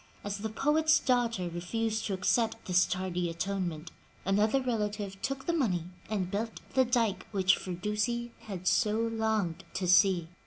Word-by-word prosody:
As 205 0 -3
the 220 +2 -3
poet's 310 +7 +3
daughter 235 -7 +1
refused 220 +6 -2
to 195 - -1
accept 225 +5 0
this 180 0 +3
tardy 180 -2 -2
atonement, 170 -2 -3 0.3
another 210 +6 +3
relative 210 -5 -2
took 270 0 -3
the 340 - +1
money 210 - +1 0.3
and 190 -4 -1
built 220 +3 -3
the 260 -1 +4
dike 235 -5 0
which 190 -3 +3
Firdusi 210 +6 -2 0.2
had 185 -3 -6
so 215 +3 +3
longed 220 -6 0
to 185 - -1
see. 185 -2 +5
210 Hz, 150 wpm, -30 LUFS, 185-230 Hz, 0.3 s, see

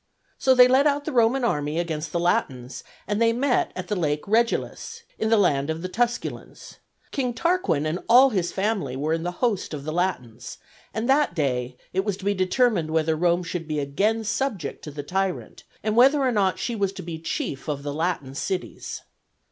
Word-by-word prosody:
So 260 -1 +4
they 250 0 +8
led 265 +3 +4
out 285 0 0
the 315 - -2
Roman 245 +1 +3
army 150 -8 0
against 160 -2 -3
the 170 - -1
Latins, 130 -7 -1 0.2
and 205 +2 -1
they 230 0 +4
met 250 +2 +1
at 185 0 -5
the 210 - -1
Lake 150 -4 -1
Regillus, 235 - 0 0.2
in 220 - 0
the 225 - +5
land 145 -8 +2
of 160 +2 -3
the - - -2
Tusculans. 240 +4 -3 0.3
King 250 -4 -2
Tarquin 335 - +1
and 155 +4 -1
all 255 +3 +7
his 180 -5 0
family 195 - -1
were 150 +4 -1
in 165 - -1
the 175 +1 -2
host 200 -8 -1
of 140 - -7
the 155 +1 -4
Latins; 125 -10 -3 0.3
and 220 +2 -3
that 270 - +3
day 125 -5 -1 0.2
it 185 - 0
was 205 -2 -2
to 200 - -10
be 205 - +2
determined 185 -2 +1
whether 160 0 +1
Rome 175 +2 +2
should 165 -1 -5
be 155 -1 -2
again 200 +11 0
subject 215 - -3
to - - -6
the 145 0 -6
tyrant 190 +4 -3 0.2
and 215 0 0
whether 270 +5 +6
or 260 -2 +2
not 195 -4 +1
she 240 - -3
was 200 -3 0
to 190 - -8
be 165 -1 -6
chief 150 -3 -4
of 145 -2 -3
the 145 -1 -3
Latin 160 -4 -2
cities. 185 +6 -4
185 Hz, 205 wpm, -24 LUFS, 155-230 Hz, 0.3 s, they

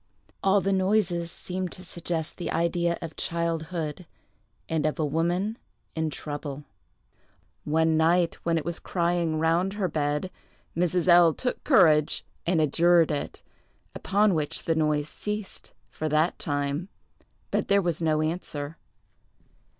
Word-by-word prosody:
All 195 +1 +4
the 195 +2 +1
noises 185 -3 +1
seemed 180 0 -5
to 185 - -10
suggest 165 -2 -4
the 175 - -4
idea 170 +1 +1
of 160 -2 -7
childhood, 165 0 -3 0.6
and 160 -1 0
of 155 - -2
a 155 - 0
woman 175 - 0 0.4
in 160 -1 0
trouble. 145 -1 -6 1.0
One 160 +1 +2
night, 170 +1 +2
when 165 -1 +1
it 155 - -3
was 170 0 -3
crying 170 -2 0
round 165 +4 +1
her 205 -3 -1
bed, 150 +2 -1 0.4
Mrs. 180 +1 +1
L—— 175 -2 +7
took 250 - -3
courage 155 - +4 0.2
and 170 -1 +3
adjured 165 +2 +4
it; 145 - -4 0.5
upon 205 +1 +2
which 155 -3 -1
the 165 - +1
noise 150 -2 +1
ceased, 210 +4 -6 0.2
for 155 - -3
that 155 +3 +1
time, 145 +3 -2 0.6
but - - 0
there 200 0 +4
was 175 -4 -1
no 155 -1 +2
answer. 155 -2 -4
165 Hz, 135 wpm, -27 LUFS, 155-180 Hz, 1.0 s, L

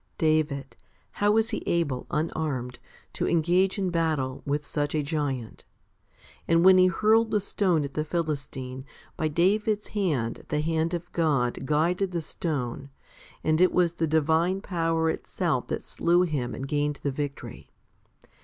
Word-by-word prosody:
2. 160 - -1
David, 150 -3 0 0.4
how 205 - +1
was 225 +1 +3
he 215 - -2
able, 145 -7 0
unarmed, 150 -6 -2 0.3
to - - -1
engage 175 +4 +2
in 190 -2 -1
battle 155 -6 -1
with 145 +1 -1
such 145 0 -2
a 150 - +1
giant? 140 -6 -3 0.8
And 165 +1 +4
when 190 0 +8
he 185 - +6
hurled 220 +5 +3
the 215 -1 +2
stone 185 -5 +1
at 140 -1 -6
the 155 - -1
Philistine, 140 -5 -4 0.3
by 155 - 0
David's 205 +6 +1
hand 150 - -1
the 150 - 0
hand 165 +2 0
of 170 0 -7
God 135 -6 0
guided 175 +5 +1
the 170 - -1
stone, 140 -5 -4 0.5
and 155 +2 +2
it 185 - +5
was 175 -2 +2
the 165 -1 -1
divine 160 +4 +2
power 165 -4 0
itself - - -2
that - - -4
slew 175 +1 +2
him 140 -8 -2
and 135 - -5
gained 145 0 -1
the 140 - 0
victory. 140 0 -6
160 Hz, 155 wpm, -27 LUFS, 145-180 Hz, 0.8 s, when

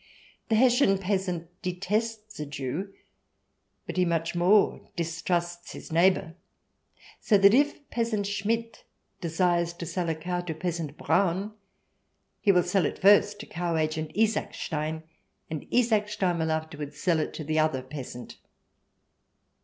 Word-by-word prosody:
The 220 - +3
Hessian 245 -3 +4
peasant 180 -3 -3
detests 215 +4 -2
a 150 - -3
Jew, 145 +7 -4 0.9
but - - -6
he 180 - +4
much 165 -1 0
more 180 +4 +3
distrusts 175 +1 -2
his - - -10
neighbour. 170 0 +3 0.9
So 210 - +4
that 200 +1 +6
if 285 +2 +2
peasant 230 -3 0
Schmidt 225 +3 -2 0.4
desires 170 0 +1
to 170 - -7
sell 175 0 -2
a 160 - 0
cow 175 +3 -3
to 170 -3 -5
peasant 165 -3 -4
Braun, 190 +4 +1 0.9
he 205 - +4
will 180 -2 +4
sell 180 -2 +2
it - - -5
first 205 +1 +5
to - - -8
Cow 170 -1 -2
Agent 155 0 -1
Isaacstein, 160 -7 -1 0.5
and 155 -3 -5
Isaacstein 210 -7 +1
will 160 0 0
afterwards 155 -2 -4
sell 165 +1 +1
it - - -2
to 155 - -5
the 155 +1 0
other 155 -4 +1
peasant. 130 -3 -8
175 Hz, 135 wpm, -27 LUFS, 160-205 Hz, 0.9 s, that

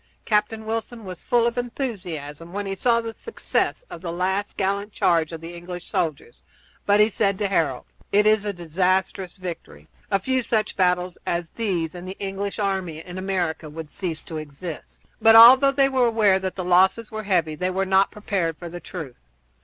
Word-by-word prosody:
Captain 215 +1 0
Wilson 225 0 -4
was 185 -2 -8
full 240 -1 +2
of 235 +1 0
enthusiasm 175 - -5
when 205 +1 -3
he 195 - -3
saw 235 +4 +2
the 230 -1 -5
success 460 - -2
of - - -9
the 170 -2 -4
last 190 +4 -2
gallant 200 +2 -1
charge 165 -5 +2
of 165 -1 -7
the 165 +1 -8
English 175 +1 -8
soldiers, 160 - -3 0.5
but 205 +1 +4
he 210 - +7
said 200 -2 0
to 205 - 0
Harold: 160 -9 0 0.3
"It 210 +1 +4
is 215 -1 +4
a 205 - -1
disastrous 185 +2 -1
victory. 170 - -8 0.2
A 195 - +2
few 260 +6 0
such 220 -3 -1
battles 180 -2 +1
as 170 -1 -2
these 180 -8 -2
and 180 0 -8
the 190 - -7
English 200 0 -4
army 190 -6 -1
in 180 +3 -8
America 175 -5 -2
would 155 0 -8
cease 165 -4 -4
to 160 - -7
exist." 155 +2 -8 0.2
But 225 0 +7
although 260 +4 +9
they 275 0 +3
were 260 -2 +2
aware 210 -4 +3
that 190 -1 -4
the 185 - -4
losses 190 +5 +3
were 215 0 -4
heavy 175 -6 +1
they 180 +5 -2
were 190 +1 0
not 190 +1 +3
prepared 185 -6 -2
for 175 +1 -8
the 175 +1 -7
truth. 160 -9 -8
190 Hz, 195 wpm, -23 LUFS, 170-215 Hz, 0.5 s, although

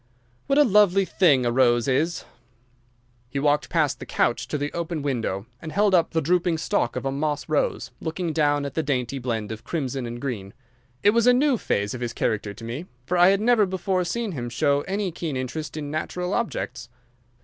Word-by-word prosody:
What 275 0 +2
a 295 - +8
lovely 195 -4 +4
thing 145 -10 +3
a 120 - +2
rose 120 -1 +3
is!" 155 +6 0 1.0
He 140 - -5
walked 145 +1 +1
past 155 -5 +1
the - - -7
couch - - 0
to - - -2
the 145 +1 -3
open 170 -3 -3
window, 115 -8 -2 0.2
and 160 - -6
held 205 +1 +2
up 170 -3 +4
the 160 -2 -1
drooping 175 +1 +2
stalk 200 +6 0
of - - -4
a 135 - 0
moss 145 +1 -2
rose, 155 -2 -1
looking 165 0 -3
down 145 -2 +2
at 140 - -5
the 160 - 0
dainty 135 -3 -2
blend 115 -4 -3
of 110 +1 -7
crimson 135 -6 -3
and 120 +1 -6
green. 110 -8 -5 0.5
It 205 - +6
was 235 +2 +2
a 250 - +7
new 275 +2 +3
phase 105 - -1
of 125 - -6
his 120 -1 -3
character 105 -2 -1
to 100 - -12
me, 125 +10 -5 0.2
for 180 - -1
I 175 0 +6
had 195 +1 +3
never 220 -3 +4
before 185 0 -1
seen 220 +5 -2
him 120 -7 -4
show 140 +4 +1
any 195 -1 -1
keen 160 -4 -4
interest 150 +5 -4
in 145 -2 -4
natural 180 +4 -3
objects. 130 - -3
150 Hz, 205 wpm, -24 LUFS, 130-180 Hz, 1.0 s, a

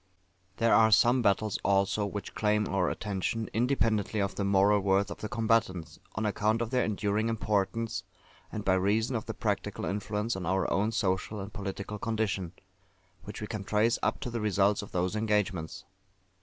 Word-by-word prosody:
There 115 0 +3
are 110 0 +6
some 120 +3 +5
battles, 105 0 +1
also, 100 +1 +2
which 100 0 -6
claim 105 -1 +1
our 95 -2 +1
attention, 105 +2 -3
independently 110 -3 +1
of 100 -1 0
the 100 - -2
moral 100 +1 +4
worth 100 +1 +1
of - - -7
the 110 - -4
combatants, 110 -7 0 0.2
on 110 - -1
account 105 +2 +1
of 115 0 -3
their 125 -1 +2
enduring 105 +1 0
importance, 105 -1 -1 0.5
and 105 -1 -5
by 95 - +4
reason 105 +6 +1
of 110 - -3
the - - -4
practical - - -2
influence 105 +3 -2
on 90 -3 -4
our 95 +2 +1
own 105 +3 +1
social 100 -1 -1
and 100 +1 -7
political 100 +1 -5
condition, 100 -6 -2 0.7
which 105 - -7
we - - -2
can 105 -1 -5
trace 110 +4 +2
up - - 0
to 125 -3 -4
the 115 -1 -3
results 100 -1 +2
of 105 - -10
those 90 +3 -1
engagements. 105 -6 -1
105 Hz, 175 wpm, -29 LUFS, 100-110 Hz, 0.7 s, are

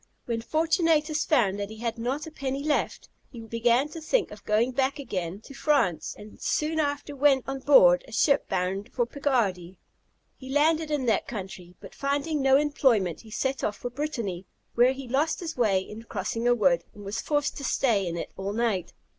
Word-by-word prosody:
When 230 -1 -2
Fortunatus 315 +2 +1
found 205 -10 +2
that 200 0 -3
he 220 - -9
had 230 0 -3
not 260 +6 -2
a 320 - -9
penny 275 -2 -3
left, 300 -1 -1 0.2
he 240 - -10
began 230 +4 +1
to 325 +2 -8
think 390 +8 0
of 210 -1 -11
going 220 +4 +2
back 265 +2 0
again 195 - -4
to 275 - -12
France, 275 - +1
and 210 +1 -13
soon 315 +1 0
after 290 -1 -2
went 275 -2 +4
on 270 0 -3
board 185 -11 +6
a - - -13
ship 280 +6 +2
bound 190 +2 -2
to 240 - +2
Picardy. 220 -10 -1 0.6
He 260 - -11
landed 310 +3 +2
in 295 -4 -1
that 230 - +1
country, 185 -5 -7
but 195 - -12
finding 285 +2 -1
no 270 0 +5
employment 260 - +1
he 225 - -15
set 265 +4 -2
off 210 - -1
for 245 - -5
Brittany, 235 - -4 0.3
when 250 +2 +4
he 270 -1 -8
lost 285 +6 0
his 330 -2 -5
way 210 -6 +2
in 210 +3 -9
crossing 230 +1 -3
a 245 - +5
wood, 180 -6 +3
and 205 -1 -11
was 200 +2 -3
forced 290 0 0
to 280 - -6
stay 225 -8 +1
in 170 0 -3
it - - -5
all 195 +1 -4
night. 220 -5 -1
245 Hz, 195 wpm, -27 LUFS, 205-285 Hz, 0.6 s, board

